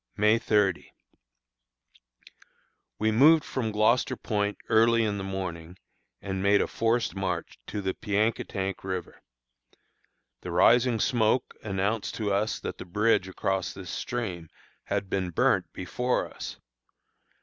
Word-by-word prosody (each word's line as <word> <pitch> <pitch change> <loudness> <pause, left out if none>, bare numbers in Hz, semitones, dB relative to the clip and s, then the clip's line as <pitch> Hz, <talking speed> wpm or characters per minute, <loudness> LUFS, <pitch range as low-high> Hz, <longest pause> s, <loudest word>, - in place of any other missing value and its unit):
May 105 +2 +4
30. 105 -5 +1 2.1
We 110 +1 +1
moved 150 +7 +6
from 115 -4 -3
Gloucester 110 +4 +2
Point 105 -2 -2
early 115 +1 +4
in 105 -2 -1
the - - -4
morning, 90 -3 -5 0.5
and 95 -1 -3
made 100 +1 +4
a - - +2
forced 115 0 0
march 95 -3 -3
to 105 - -4
the 95 0 -1
Piankatank 105 -2 -1
River. 95 -1 -5 1.2
The - - -7
rising 115 +7 +4
smoke 120 +1 +1
announced 100 +2 -2
to 105 -3 -1
us 105 +2 0
that - - -5
the - - -5
bridge 105 +2 +2
across 95 0 -2
this 95 -3 -8
stream 95 -10 -4 0.4
had - - -2
been 95 -1 -1
burnt 85 - +1
before 125 +7 -1
us. - - -7
105 Hz, 125 wpm, -27 LUFS, 95-115 Hz, 2.1 s, moved